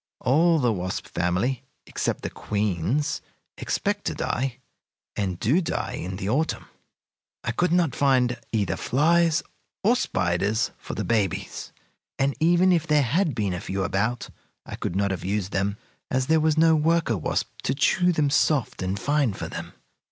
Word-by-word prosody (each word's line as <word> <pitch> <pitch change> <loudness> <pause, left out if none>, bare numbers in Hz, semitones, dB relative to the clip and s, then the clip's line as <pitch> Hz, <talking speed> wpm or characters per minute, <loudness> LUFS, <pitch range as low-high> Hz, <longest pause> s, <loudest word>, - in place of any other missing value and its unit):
All 165 +6 +4
the 125 -6 +2
wasp 95 -1 -3
family, 95 +9 -1 0.2
except - - -2
the - - -3
queens, 105 - -1 0.3
expect - - -2
to - - -1
die, 130 -1 -2 0.6
and 95 -4 -2
do 145 - +3
die 165 - -2
in 90 +1 -5
the 95 0 -4
autumn. 145 +9 0 0.8
"I 120 - -1
could 175 +9 +1
not 170 -6 +2
find 125 -3 +2
either 105 -4 0
flies 165 +5 +2 0.4
or 230 +5 +4
spiders 100 - 0
for - - -7
the - - -2
babies, 105 -7 -1 0.5
and 135 0 +1
even 175 +3 +4
if 165 -2 +1
there 150 -1 +4
had 155 - +1
been 105 -5 -1
a 90 - -4
few 95 0 -2
about 100 +5 -1 0.3
I - - -6
could 85 - -4
not 100 0 +1
have 95 - -4
used 100 0 -2
them, 100 +2 -1 0.3
as 130 0 +1
there 160 +3 +3
was 155 0 +2
no 160 0 +5
worker 160 -5 +2
wasp 90 - -2
to 135 - -1
chew 180 +5 +3
them 150 -4 +1
soft 145 -7 +1
and 95 +2 -2
fine 145 -5 +1
for - - -5
them. - - -6
125 Hz, 165 wpm, -25 LUFS, 100-160 Hz, 0.8 s, no